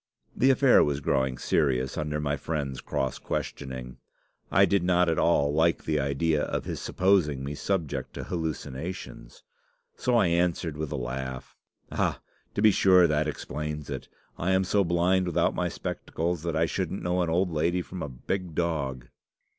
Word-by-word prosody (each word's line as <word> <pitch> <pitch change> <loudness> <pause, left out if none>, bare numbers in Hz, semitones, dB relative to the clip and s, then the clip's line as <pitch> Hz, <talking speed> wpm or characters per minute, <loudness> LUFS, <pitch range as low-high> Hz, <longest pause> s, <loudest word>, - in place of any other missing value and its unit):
"The 130 - +4
affair 135 -1 +6
was 70 -1 0
growing 65 -2 0
serious 65 -4 +1
under 75 0 -2
my 75 -1 0
friend's 75 -2 -3
cross 65 -1 -2
questioning. 65 -3 -5 0.5
I 100 +2 +5
did 100 -1 +2
not 90 0 +3
at 80 - +1
all 70 -4 +3
like 80 +2 +2
the 75 -1 0
idea 75 +3 +1
of - - -2
his - - -4
supposing 90 -8 +2
me 70 +2 -4
subject 75 -6 -2
to - - -5
hallucinations. 80 -5 -5 0.5
So 125 - 0
I 115 - +4
answered, 85 -2 +1
with 75 -1 -4
a - - -2
laugh, 65 0 -5 0.4
'Ah! - - 0 0.4
to - - 0
be 110 - +8
sure, 95 -2 +6
that 75 -1 +1
explains 75 -1 -5
it. 65 - -5 0.3
I 95 +3 +1
am 95 0 +3
so 100 +2 +2
blind 90 +2 +2
without 85 - +2
my - - -1
spectacles, 85 0 -3
that 85 -1 -2
I 80 +1 +3
shouldn't 75 - -3
know 90 +1 +1
an 85 - 0
old 90 +2 +1
lady 85 +3 0
from 90 +1 -8
a 75 - -3
big 85 +7 -4
dog. 70 -7 -1
80 Hz, 170 wpm, -27 LUFS, 70-90 Hz, 0.5 s, be